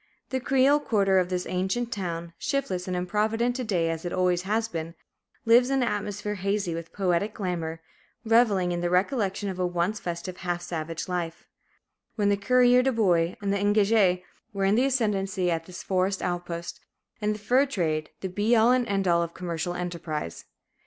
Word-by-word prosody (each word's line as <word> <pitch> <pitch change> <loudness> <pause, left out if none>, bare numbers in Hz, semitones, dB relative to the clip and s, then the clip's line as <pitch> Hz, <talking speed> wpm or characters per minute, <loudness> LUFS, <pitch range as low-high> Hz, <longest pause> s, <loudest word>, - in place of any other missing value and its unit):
The 260 - 0
creole 270 +3 +3
quarter 195 -8 +2
of 180 -1 0
this 180 -1 -2
ancient 190 +7 -1
town, 170 -4 -4
shiftless 190 -11 -2
and 180 -1 -1
improvident 220 +6 0
to 255 - -2
day 180 -7 0
as 165 0 -5
it 175 - -3
always 180 -1 +1
has 220 +1 +1
been, 165 -4 -5 0.5
lives 240 +2 +5
in 270 -1 +2
an - - 0
atmosphere 210 0 -3
hazy 195 -2 -1
with 165 0 -6
poetic 195 +2 0
glamour, 165 -4 -3 0.4
reveling 220 -6 +3
in 175 0 -2
the 175 - 0
recollection 200 +1 0
of 185 -2 -4
a 180 - +1
once 175 +4 -1
festive, 175 +1 -5
half 175 -1 -3
savage 165 -1 -4
life, 175 -2 -4 0.7
when 205 -2 +2
the 200 - +4
courier 250 +4 +4
de 265 +1 +2
bois 180 -7 +2
and 200 0 +1
the - - +1
engagé 205 -2 +3 0.3
were 195 -1 0
in 195 - +3
the 245 +5 +3
ascendency 195 -8 0
at 165 -1 -2
this 175 -1 -9
forest 190 +1 0
outpost, 175 -1 -4 0.4
and 210 0 0
the - - -9
fur 250 +7 +3
trade 160 - -1
the 190 - -2
be 205 +6 +1
all 230 +2 +5
and 250 -1 +2
end 195 -2 0
all 170 -1 +4
of 170 0 -4
commercial 175 -1 -3
enterprise. 170 - -4
190 Hz, 185 wpm, -26 LUFS, 175-220 Hz, 0.7 s, lives